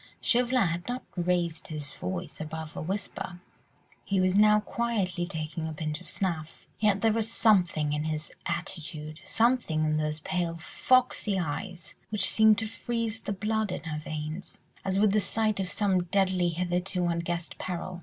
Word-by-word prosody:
Chauvelin 250 -1 +3
had 170 +1 -3
not 250 +1 -3
raised 175 -2 0
his 150 -2 -6
voice 180 -4 -5
above 160 0 -6
a - - -4
whisper; 190 0 -4 0.6
he 195 -1 0
was 185 0 +3
now 210 +1 +6
quietly 195 -8 -1
taking 160 0 -4
a 160 - -4
pinch 155 +1 -3
of - - -9
snuff, 165 -5 -3
yet 205 -2 +3
there 225 -1 +4
was 225 0 0
something 175 -10 +3
in 150 +1 -1
his 155 0 -2 0.2
attitude, 160 -3 -3
something 230 -10 +2
in 155 0 +1
those 155 0 -1
pale, 175 -1 -1
foxy 240 +2 +2
eyes, 180 +1 -4 0.2
which 210 -1 +3
seemed 220 -1 +6
to 225 - -1
freeze 225 0 -3
the 205 - -4
blood 215 +1 0
in - - -4
her 155 -2 -3
veins, 155 +3 -6 0.2
as 190 0 0
would 205 0 +5
the 215 - +4
sight 215 0 +1
of 190 -1 0
some 190 -4 +2
deadly 185 -1 +2
hitherto 180 +1 -1
unguessed 170 0 -2
peril. 180 0 -4
180 Hz, 165 wpm, -29 LUFS, 160-210 Hz, 0.6 s, now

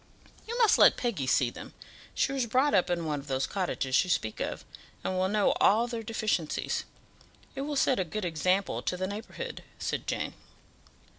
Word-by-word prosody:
"You 470 +2 -3
must 460 -3 +5
let - - +7
Peggy 205 - -1
see 125 -2 +3
them; - - -10 0.4
she - - +1
was 265 -3 -1
brought 260 +6 +2
up 185 -3 +3
in 170 -2 -1
one 150 -2 -1
of 140 - -11
those 135 -1 0
cottages 175 -9 0
you 185 - -7
speak 110 -10 0
of, - - -4 0.4
and - - -1
will 185 0 +1
know 210 0 +3
all 220 +4 +5
their 235 -1 -4
deficiencies. 215 -7 -1 0.7
It 270 - -4
will 290 +1 -3
set 265 -3 +3
a - - +2
good 185 +4 -4
example 180 +4 0
to 180 - -2
the 185 - -1
neighbourhood," 220 - -6
said - - -3
Jane. - - -2
195 Hz, 190 wpm, -29 LUFS, 170-240 Hz, 0.7 s, let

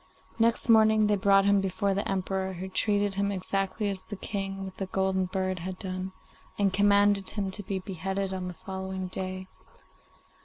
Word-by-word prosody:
Next 230 +1 +3
morning 220 -1 +6
they 210 0 +3
brought 195 0 +4
him 200 -1 +4
before 195 +1 0
the 200 +2 -2
Emperor, 190 0 -1
who 185 +1 -6
treated 205 +1 +1
him 200 +1 0
exactly 195 +2 -1
as 195 -2 -2
the 205 - -7
King 195 -1 -4
with 190 -1 -9
the 195 - -3
golden 190 0 0
bird 185 0 -2
had 185 +2 -5
done, 185 0 -4 0.5
and 200 -2 +2
commanded 200 0 +4
him 195 -3 -3
to 205 - -5
be 200 -1 -3
beheaded 190 +1 -3
on 185 -1 -3
the 180 - -6
following 190 0 -5
day. 185 0 -4
195 Hz, 180 wpm, -28 LUFS, 190-200 Hz, 0.5 s, morning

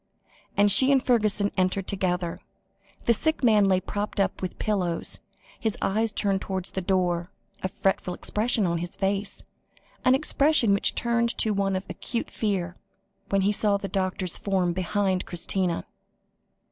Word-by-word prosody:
and 205 0 +6
she 265 +7 +7
and 270 -2 +3
Fergusson 215 -4 +1
entered 185 +1 +1
together. 180 -3 -2 0.7
The 235 - +5
sick 315 +6 -1
man 215 -4 +5
lay 190 -1 +3
propped 205 +3 -4
up 195 - 0
with 185 - -4
pillows, 180 -6 0 0.4
his 220 -3 -1
eyes 220 +3 0
turned 195 -2 0
towards 190 -2 -4
the 190 - -3
door, 180 -2 0 0.3
a - - -1
fretful 185 -1 -1
expression 220 -1 0
on 170 -1 0
his 175 +1 -4
face, 200 +1 -1 0.6
an 255 +1 +5
expression 280 -5 +3
which 200 - +1
turned 235 0 +1
to 220 - +3
one 195 -1 0
of 185 - -3
acute 235 -2 -5
fear, 190 -4 -2 0.5
when 195 0 +2
he 200 +2 +2
saw 205 -1 +1
the 195 - -5
doctor's 185 -2 -2
form 185 -3 0
behind 185 +1 -1
Christina. 175 0 -1
195 Hz, 155 wpm, -26 LUFS, 185-215 Hz, 0.7 s, she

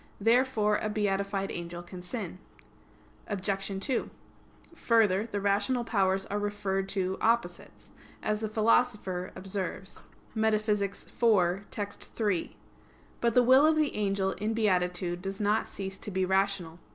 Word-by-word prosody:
Therefore 225 -1 +3
a 215 - -2
beatified 200 -1 -1
angel 175 0 -6
can 180 +1 -9
sin. 185 -2 -5 0.9
Obj. 195 -1 -1
2: 260 -4 -1 0.6
Further, 225 - +2
the 205 -3 -3
rational 205 +5 +1
powers 195 -4 +1
are 205 - -2
referred 200 -2 -2
to 190 -1 -1
opposites, 235 +1 -1 0.3
as 210 0 0
the 220 -1 -3
Philosopher 215 -4 +1
observes 195 0 -5 0.3
(Metaph. 215 -1 +2 0.8
iv, 205 - -21
text. 205 -1 -6
3). 205 -7 -1 0.6
But 235 -1 +2
the 250 - +6
will 260 +3 +6
of 315 +1 +5
the 305 -2 +1
angel 195 -2 0
in 215 +3 -2
beatitude 180 -4 +1
does 195 +1 -5
not 210 +1 +1
cease 190 -1 -6
to - - -5
be 190 -1 0
rational. 190 -3 0
200 Hz, 135 wpm, -29 LUFS, 190-220 Hz, 0.9 s, the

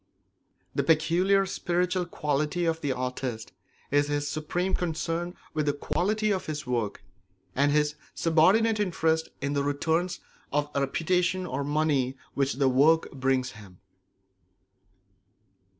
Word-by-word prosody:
The - - +1
peculiar 175 +5 +3
spiritual 180 0 -1
quality 150 +2 -1
of 165 0 0
the 145 - 0
artist 125 -2 -4 0.4
is 145 +1 +3
his 145 0 -1
supreme 175 +5 -2
concern 170 +1 -2 0.2
with 155 -1 -1
the 145 - +3
quality 210 +8 0
of 190 -2 -2
his 155 -1 -4
work 115 -5 -2 0.5
and 145 +2 +3
his 150 0 +2 0.2
subordinate 195 +8 +4
interest 160 -5 +1
in 140 +1 -1
the 140 -1 +1
returns 160 +5 0 0.3
of 145 +1 0
reputation 180 +6 0
or 140 -4 -3
money 145 -3 +1 0.2
which 140 0 +1
the 135 +1 +2
work 145 +6 +4
brings 130 -1 0
him. 100 -7 -14
155 Hz, 125 wpm, -27 LUFS, 140-175 Hz, 0.5 s, subordinate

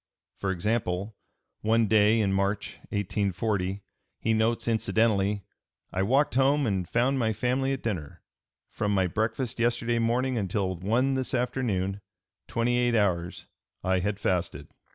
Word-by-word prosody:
For 100 - -1
example, 100 +1 -1 0.5
one 115 +1 +3
day 110 +1 +4
in 100 -2 +1
March, 100 +1 -1
1840, 100 -1 -1 0.4
he 115 - +1
notes 110 +2 +1
incidentally: 105 -2 +1 0.5
"I 95 - 0
walked 135 +9 +2
home 140 +2 +3
and 95 -5 -1
found 130 +3 +2
my 110 -2 +1
family 125 +5 0
at 135 - -3
dinner. 90 -10 -4 0.5
From 105 -1 -1
my 95 -1 +3
breakfast 110 +5 -2
yesterday 120 0 +1
morning 120 +2 +1
until 95 -1 -1
one 115 +9 +1
this 130 -1 -1
afternoon, 105 -6 -1 0.5
twenty 120 +1 +1
eight 120 -1 +2
hours, 90 -5 0 0.4
I 95 0 +2
had 100 +2 -2
fasted." 90 -3 -1
110 Hz, 135 wpm, -27 LUFS, 95-120 Hz, 0.5 s, day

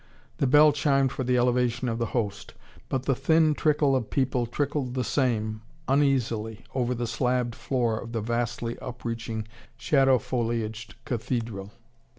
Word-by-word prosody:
The 135 - +2
bell 150 +3 +7
chimed 140 -2 +2
for 130 - -3
the 125 0 +2
elevation 125 0 +1
of 115 0 -2
the 115 - 0
Host. 100 -4 -3 0.3
But 130 -1 -1
the 135 - +2
thin 155 +4 +3
trickle 150 -2 +2
of 125 -5 -1
people 130 -3 0
trickled 140 0 -2
the 130 - 0
same, 110 -6 0 0.3
uneasily, 120 -6 +1
over 125 -1 0
the 120 0 -2
slabbed 125 +1 0
floor 120 -3 -1
of 115 - -8
the 115 -2 -2
vastly 120 +1 -2
upreaching 115 -3 -4 0.3
shadow 135 -1 +4
foliaged 115 -2 -3
cathedral. 115 -4 -3
125 Hz, 150 wpm, -27 LUFS, 115-135 Hz, 0.3 s, bell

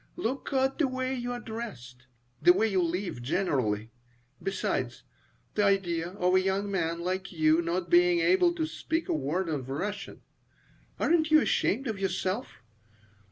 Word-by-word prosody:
Look 270 -5 -3
at 265 +1 +1
the 300 - +3
way 260 0 -2
you 245 -1 -3
are 245 - -4
dressed, 130 - -8 0.3
the 355 - +7
way 225 - +2
you 190 -4 +1
live 175 -5 -2
generally. 120 - -1 0.5
Besides, 195 - -2 0.5
the 210 - +1
idea 175 -4 +1
of 180 -2 +1
a 185 - +5
young 195 +2 -1
man 170 -3 -1
like 185 +2 -3
you 160 -1 +3
not 170 +2 -2
being 350 0 +5
able 350 +1 +4
to 320 -2 0
speak 325 +1 -3
a - - +2
word 155 +5 -1
of 140 -5 -3
Russian! 200 +9 -4 0.8
Aren't 315 -2 +2
you 310 0 +7
ashamed 270 -3 +1
of 220 -5 -3
yourself? 190 +4 -2
195 Hz, 160 wpm, -29 LUFS, 170-260 Hz, 0.8 s, the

